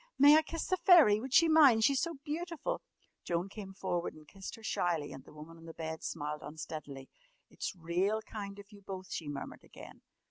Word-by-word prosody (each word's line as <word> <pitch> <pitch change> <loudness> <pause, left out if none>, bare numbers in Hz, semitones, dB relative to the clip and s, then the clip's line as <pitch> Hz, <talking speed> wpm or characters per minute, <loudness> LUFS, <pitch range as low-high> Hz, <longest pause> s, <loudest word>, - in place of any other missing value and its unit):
May 290 +2 +8
I 315 - +6
kiss 330 +1 -5
the 370 - 0
fairy? 335 - +6
Would 260 +1 -6
she 335 +5 +6
mind? 285 -8 +6
She's 275 +3 +3
so 335 -1 -2
beautiful!" 330 +2 -3 0.4
Joan 175 +2 -2
came 200 -1 -8
forward 175 -2 -3
and 155 -1 -16
kissed 195 +2 -8
her 225 - -16
shyly, 170 -8 -1
and 135 - -10
the - - -16
woman 155 +2 -12
on 165 - -14
the 165 - -10
bed 160 0 -5
smiled 150 -1 -4
unsteadily. 150 -3 -8 0.4
"It's - - -5
real 185 +6 -1
kind 200 -2 -7
of 200 +1 -13
you 205 -1 -14
both," 190 -1 -8
she 160 - -4
murmured 145 -1 -7
again. - - -13
195 Hz, 205 wpm, -32 LUFS, 160-270 Hz, 0.4 s, May